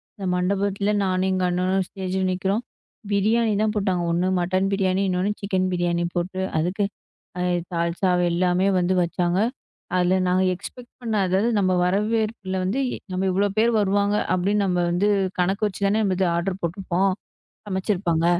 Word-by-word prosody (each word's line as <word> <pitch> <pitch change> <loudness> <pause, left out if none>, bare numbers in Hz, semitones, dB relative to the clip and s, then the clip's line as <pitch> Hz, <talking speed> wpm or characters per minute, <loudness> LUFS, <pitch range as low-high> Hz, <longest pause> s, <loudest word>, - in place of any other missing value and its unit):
அந்த 195 - -6
மண்டபத்துல 200 +2 0
நானும் 185 0 +1
எங்க 185 0 0
அண்ணனும் 185 +1 0
ஸ்டேஜ்ல 190 -1 -3
நிக்கறோம். 195 +5 -1 0.5
பிரியாணி 215 +2 +2
தான் 215 -1 +1
போட்டாங்க. 190 -4 0
ஒண்ணு 175 +2 +1
மட்டன் 185 +2 +1
பிரியாணி. 190 -1 +1
இன்னொன்னு 185 +2 0
சிக்கன் 190 -2 0
பிரியாணி 175 -1 0
போட்டு, 180 +2 -2 0.2
அதுக்கு 180 +6 0 0.6
அ - - -1 0.3
தால்சா 170 +2 0 0.2
எல்லாமே 180 +2 +2
வந்து 180 +1 +1
வச்சாங்க. 175 +1 0 0.6
அதுல 180 +1 +3
நாங்க 185 +1 +2
எக்ஸ்பெக்ட் 240 +7 -10
பண்ணாதது 205 -3 +1
நம்ம 185 -1 +2
வரவேற்புல 210 +1 0
வந்து, 200 +9 -1 0.3
நம்ம 185 +1 -1
இவ்ளோ 200 +2 +2
பேர் 230 +2 +4
வருவாங்க 205 +1 +2 0.2
அப்பிடின்னு 200 +3 +1
நம்ம 180 -1 0
வந்து 195 +4 +2 0.3
கணக்கு 195 +4 +1
வச்சு 200 0 -8
தானே 210 +2 +2 0.2
இது 190 - +2
ஆர்ட்ர் 185 +2 -2
போட்ருப்போம். 185 +2 0 0.6
சமைச்சு 190 +1 -1
இருப்பாங்க. 170 -3 0
190 Hz, 145 wpm, -23 LUFS, 180-200 Hz, 0.6 s, பேர்